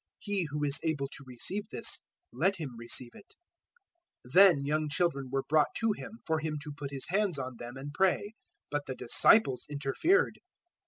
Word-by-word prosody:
He 200 Hz, -5 st, -2 dB
who 150 Hz, +1 st, -3 dB
is 140 Hz, -1 st, +2 dB
able 150 Hz, -4 st, -1 dB
to 135 Hz, -, -11 dB
receive 195 Hz, -, -4 dB
this, -, -, -2 dB, 0.3 s
let 195 Hz, +2 st, +2 dB
him 155 Hz, -7 st, -5 dB
receive 120 Hz, +1 st, -3 dB
it." 205 Hz, -, -16 dB, 0.9 s
019:013 125 Hz, -, -13 dB
Then 180 Hz, -7 st, +7 dB
young 155 Hz, +1 st, 0 dB
children 145 Hz, -5 st, 0 dB
were 135 Hz, 0 st, 0 dB
brought 155 Hz, -1 st, +3 dB
to 225 Hz, -1 st, +2 dB
Him 210 Hz, -, -6 dB
for 160 Hz, -1 st, +1 dB
Him 155 Hz, -1 st, -3 dB
to 150 Hz, -2 st, -7 dB
put 145 Hz, -1 st, -5 dB
His 135 Hz, -1 st, -4 dB
hands 195 Hz, -3 st, +1 dB
on 130 Hz, -2 st, -5 dB
them 120 Hz, +2 st, -8 dB
and 140 Hz, +2 st, -6 dB
pray; 195 Hz, +4 st, +1 dB, 0.4 s
but 145 Hz, 0 st, -2 dB
the 130 Hz, -, -4 dB
disciples 130 Hz, -, +4 dB
interfered. 145 Hz, -, +1 dB
150 Hz, 180 wpm, -31 LUFS, 135-185 Hz, 0.9 s, Then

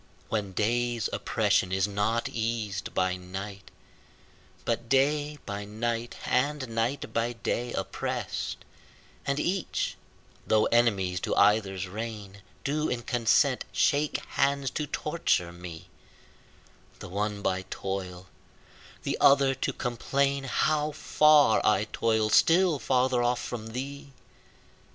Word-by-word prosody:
When 105 Hz, -3 st, -2 dB
day's 120 Hz, +3 st, 0 dB
oppression 95 Hz, -, +1 dB
is 95 Hz, +1 st, +1 dB
not 105 Hz, +3 st, 0 dB
eas'd 110 Hz, -4 st, -3 dB
by 95 Hz, 0 st, +1 dB
night, 95 Hz, +2 st, -8 dB, 1.0 s
But 115 Hz, 0 st, -2 dB
day 145 Hz, +3 st, +2 dB
by 100 Hz, -1 st, -4 dB
night 115 Hz, +3 st, -3 dB
and 140 Hz, +1 st, 0 dB
night 115 Hz, +4 st, -2 dB
by 115 Hz, +1 st, 0 dB
day 120 Hz, +1 st, -2 dB
oppress'd, -, -, -3 dB, 0.6 s
And 140 Hz, +1 st, 0 dB
each, 180 Hz, +2 st, -1 dB, 0.5 s
though 110 Hz, 0 st, +4 dB
enemies 100 Hz, -7 st, +2 dB
to -, -, -2 dB
either's 100 Hz, -2 st, +3 dB
reign, 105 Hz, -1 st, -7 dB, 0.2 s
Do 150 Hz, +2 st, 0 dB
in 120 Hz, -1 st, -2 dB
consent 120 Hz, +3 st, +2 dB
shake 145 Hz, +1 st, +2 dB
hands 140 Hz, -1 st, +1 dB
to 150 Hz, -, -3 dB
torture 150 Hz, -, 0 dB
me, 85 Hz, -2 st, -9 dB, 1.1 s
The -, -, -9 dB
one 100 Hz, +2 st, -3 dB
by 95 Hz, 0 st, -1 dB
toil, 95 Hz, -2 st, -5 dB, 0.8 s
the -, -, -2 dB
other 140 Hz, -1 st, +6 dB
to 135 Hz, -, -2 dB
complain 135 Hz, +3 st, -1 dB
How 150 Hz, +4 st, +1 dB
far 150 Hz, -5 st, +5 dB
I 105 Hz, 0 st, +3 dB
toil, 110 Hz, -1 st, +1 dB
still 170 Hz, -, +4 dB
farther 130 Hz, -1 st, +2 dB
off 120 Hz, 0 st, +1 dB
from 115 Hz, -3 st, -5 dB
thee. 135 Hz, +4 st, -6 dB
115 Hz, 120 wpm, -28 LUFS, 100-140 Hz, 1.1 s, other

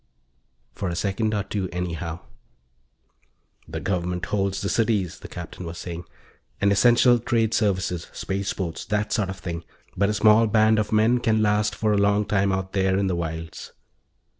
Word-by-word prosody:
For 100 Hz, -, -3 dB
a 85 Hz, -, -3 dB
second 105 Hz, +4 st, 0 dB
or 105 Hz, -, 0 dB
two, 95 Hz, -2 st, -3 dB
anyhow. 85 Hz, -1 st, -4 dB, 1.5 s
"The -, -, -5 dB
Government 90 Hz, -2 st, -2 dB
holds 100 Hz, -1 st, -1 dB
the 100 Hz, -, -2 dB
cities," 105 Hz, -6 st, 0 dB
the -, -, -9 dB
Captain -, -, -8 dB
was 85 Hz, 0 st, -6 dB
saying, 85 Hz, 0 st, -6 dB, 0.5 s
"and 100 Hz, 0 st, +3 dB
essential 120 Hz, +3 st, +5 dB
trade 115 Hz, -1 st, +1 dB
services 95 Hz, -5 st, 0 dB
spaceports, 95 Hz, -3 st, -3 dB
that 105 Hz, 0 st, -1 dB
sort 105 Hz, -4 st, 0 dB
of 95 Hz, -, -5 dB
thing. 85 Hz, -3 st, -5 dB, 0.3 s
But 100 Hz, +2 st, +2 dB
a 105 Hz, -, 0 dB
small 110 Hz, +2 st, +5 dB
band 110 Hz, +1 st, +4 dB
of 105 Hz, -, -2 dB
men 110 Hz, +3 st, +3 dB
can 110 Hz, -2 st, +2 dB
last 105 Hz, 0 st, +1 dB
for 110 Hz, -1 st, +1 dB
a -, -, +2 dB
long 100 Hz, +1 st, +3 dB
time 100 Hz, -1 st, +1 dB
out 95 Hz, 0 st, -3 dB
there 95 Hz, -1 st, +2 dB
in 100 Hz, -, +1 dB
the 95 Hz, -2 st, 0 dB
wilds." 80 Hz, -1 st, -5 dB
100 Hz, 170 wpm, -24 LUFS, 90-105 Hz, 1.5 s, essential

